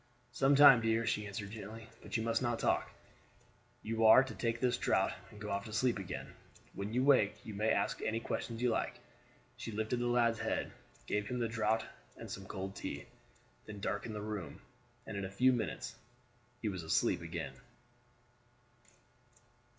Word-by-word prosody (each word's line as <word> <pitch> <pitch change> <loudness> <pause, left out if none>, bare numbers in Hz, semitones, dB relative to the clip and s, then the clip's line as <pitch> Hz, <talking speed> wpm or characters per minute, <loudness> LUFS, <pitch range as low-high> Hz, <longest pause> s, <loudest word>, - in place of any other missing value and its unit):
"Some 135 +3 +3
time, 135 -4 +9
dear," 115 0 +1
she 105 -2 0
answered 100 0 -5
gently; 110 +1 -8
"but - - -3
you 110 - -1
must 115 +1 +1
not 120 -2 0
talk. - - +1 0.9
You 115 +1 -1
are 120 +4 +9
to 135 - -7
take 115 -1 -1
this 125 -1 +2
draught - - +2 0.2
and 105 - -13
to 105 - -7
go - - -3
off 100 0 -2
to 110 - -8
sleep 120 0 +2
again; 95 - -6 0.4
when 100 +2 -4
you 125 +3 +1
wake 130 -7 +5
you 110 - -6
may 105 +2 0
ask - - +1
any 110 +1 0
questions 115 0 -4
you 125 - +3
like." - - -1 0.6
She - - -5
lifted 110 +3 -1
the 120 - 0
lad's 120 -2 +3
head, - - -1 0.3
gave 105 0 -1
him 125 - -2
the 120 -1 0
draught 110 0 0 0.3
and - - -8
some 95 -1 -6
cold 95 0 -5
tea, - - -5 0.6
then 105 -1 -7
darkened 105 +3 -3
the 105 - -4
room, 105 -8 -5 0.4
and 110 - -6
in 100 - -3
a - - -5
few 125 +7 +4
minutes 120 - -3 0.7
he - - 0
was 95 -4 -2
asleep 80 - +1
again. - - -5
110 Hz, 180 wpm, -34 LUFS, 105-120 Hz, 0.9 s, time